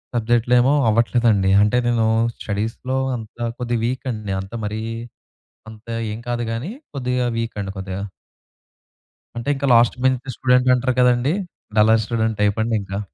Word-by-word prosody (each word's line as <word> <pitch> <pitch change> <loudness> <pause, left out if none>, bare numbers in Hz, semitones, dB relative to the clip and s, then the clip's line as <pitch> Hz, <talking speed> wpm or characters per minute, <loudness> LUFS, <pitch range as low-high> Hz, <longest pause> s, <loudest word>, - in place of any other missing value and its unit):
సబ్జెక్ట్‌లేమో 120 +3 +3 0.2
అవ్వట్లేదండి. 115 -3 +2
అంటే 105 +4 +3
నేను 115 -2 +2 0.3
స్టడీస్‌లో 115 +5 -3 0.2
అంతా 115 +1 -6
కొద్దిగా 120 -2 -1
వీక్ 130 +3 -3
అండి. 110 -3 -5
అంత 95 +3 -11
మరీ 105 +1 -3 0.9
అంతా 110 +1 -10 0.2
ఏం 110 - -5
కాదు 120 0 -1
గాని, 125 - -4 0.2
కొద్దిగా 125 -2 -1
వీక్ 115 -1 -3
అండి 100 -1 -4
కొద్దిగా. 95 0 -5 1.4
అంటే 120 +4 -3
ఇంకా 140 +1 -2
లాస్ట్ 115 0 +5
బెంచ్ 130 0 +1
స్టూడెంట్ 125 0 +3
అంటారు 130 0 0
కదండీ! 125 +3 +3 0.4
డల్లర్ 110 +1 +5
స్టూడెంట్ 110 -2 -1
టైప్ 105 0 +2
అండి 115 0 0
ఇంకా. 100 0 -5
115 Hz, 140 wpm, -21 LUFS, 110-125 Hz, 1.4 s, లాస్ట్